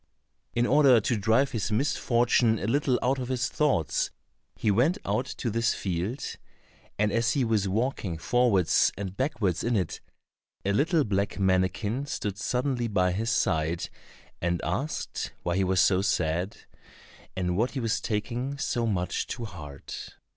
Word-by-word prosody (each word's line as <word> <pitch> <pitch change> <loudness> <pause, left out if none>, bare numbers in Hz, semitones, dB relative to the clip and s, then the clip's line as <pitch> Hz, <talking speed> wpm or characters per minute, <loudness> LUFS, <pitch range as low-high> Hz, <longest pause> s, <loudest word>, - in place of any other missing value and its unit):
In 120 0 +3
order 135 -3 +6
to 120 +3 0
drive 115 +6 +2
his 110 -1 -2
misfortune 120 -1 +2
a 100 - -4
little 130 +2 +2
out 130 +2 +1
of 125 - -3
his 125 -1 -1
thoughts, 135 - +1 0.5
he 105 - +1
went 135 - +3
out 125 +2 0
to 120 - -3
this 115 +2 +1
field, 95 +8 -3 0.6
and 105 0 +2
as 115 +2 +2
he 140 - +1
was 110 -3 +1
walking 105 -4 -1
forwards 105 -2 +3
and 95 -1 -5
backwards 115 - 0
in 120 0 +1
it, 95 -5 -2 0.6
a 100 - +2
little 155 - +3
black 100 -3 -1
mannikin 100 +7 +1
stood 100 -7 -3
suddenly 125 +4 0
by 90 -4 +2
his 110 +5 -1
side, 80 -5 0 0.5
and 85 0 0
asked 120 - -3
why 85 - 0
he 95 - +2
was 95 0 +2
so 95 0 +4
sad, 90 0 0 0.8
and 90 -1 -1
what 115 +6 +2
he 135 - -2
was 115 -1 0
taking 120 +5 -2
so 120 -5 -1
much 90 -5 -1
to 115 - -4
heart. 75 -9 -9
110 Hz, 155 wpm, -27 LUFS, 95-125 Hz, 0.8 s, order